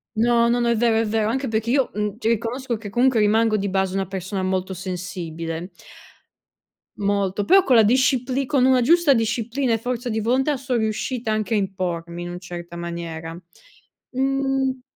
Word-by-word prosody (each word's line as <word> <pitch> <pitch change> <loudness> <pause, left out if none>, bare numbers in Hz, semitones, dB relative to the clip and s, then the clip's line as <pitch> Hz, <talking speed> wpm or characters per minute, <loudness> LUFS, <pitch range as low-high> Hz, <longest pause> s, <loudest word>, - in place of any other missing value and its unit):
No, 235 +1 +3
no, 240 +1 +2
no, 240 - +1
è 235 - +3
vero, 230 0 +2
è 225 - +2
vero. 215 0 0
Anche 265 +3 -1
perché 220 0 -1
io, 265 +1 +2
mhmm, 210 0 -2
cioè, 225 - -2
riconosco 235 +3 -1
che 215 -1 -8
comunque 245 +2 +2
rimango 215 +1 +3
di 200 -1 -1
base 190 0 0
una 195 -1 -1
persona 190 0 -4
molto 185 0 -1
sensibile. 175 -2 -5 1.3
Molto, 200 0 0
però 385 +1 +6
con 260 - +3
la 220 - +7
discipli 255 +3 +2
con 260 -2 +2
una 260 -1 +4
giusta 330 +2 +5
disciplina 235 +2 -1
e 225 - +2
forza 245 +1 -3
di 220 - -1
volontà, 265 +6 +1
son 255 -2 -2
riuscita 220 +1 -2
anche 215 +1 -1
a - - +3
impormi 175 -3 -3
in 175 - -6
un 175 0 -6
certa 175 -1 -8
maniera. 170 -1 -6 0.7
Mhmm 270 0 0
220 Hz, 180 wpm, -22 LUFS, 190-250 Hz, 1.3 s, la